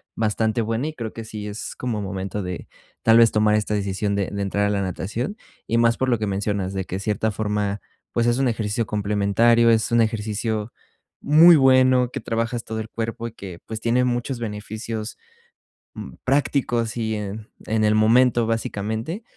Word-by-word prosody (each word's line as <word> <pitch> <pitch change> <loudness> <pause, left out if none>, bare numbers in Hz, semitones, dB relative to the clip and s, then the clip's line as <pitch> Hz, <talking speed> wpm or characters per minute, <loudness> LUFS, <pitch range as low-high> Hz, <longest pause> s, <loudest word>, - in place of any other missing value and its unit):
bastante 110 +1 0
buena 115 +5 -1
y 155 - -7
creo 115 -6 -5
que 115 - -7
sí 105 -1 -7
es 105 +2 -6
como 120 -4 -3
momento 95 +1 -4
de, 90 -1 -6 0.3
tal 115 0 +5
vez, 115 -1 +6
tomar 105 0 +3
esta 105 0 -1
decisión 100 0 -1
de 100 -1 -1
de 100 0 -4
entrar 100 +1 0
a - - 0
la 100 -1 0
natación 110 - -4 0.3
y 115 - +1
más 115 0 +3
por 130 - 0
lo 120 -3 +2
que 110 - -1
mencionas, 100 -1 -2
de 95 -1 -2
que, 95 +2 -4
cierta 105 +2 -1
forma, 105 -1 -2 0.3
pues, 120 0 +1
es 120 +1 +2
un 135 -1 +2
ejercicio 110 -1 -1
complementario, 105 +3 +3
es 110 0 +1
un 115 0 +4
ejercicio 110 0 -2 0.5
muy 165 +3 +7
bueno, 130 -2 +4
que 135 - -4
trabajas 115 +1 -2
todo 110 0 -5
el 110 0 -6
cuerpo 115 +1 -4
y 115 - -8
que, 95 -6 -9
pues, 110 0 -6
tiene 120 +2 +2
muchos 125 +1 -1
beneficios, 110 0 -5 0.8
mm, - - -8
prácticos 125 -4 0
y 110 -1 -1
en 105 +1 -6 0.2
en 110 0 +1
el 105 0 +3
momento, 115 +2 +4
básicamente. 115 - -3
110 Hz, 185 wpm, -23 LUFS, 105-120 Hz, 0.8 s, muy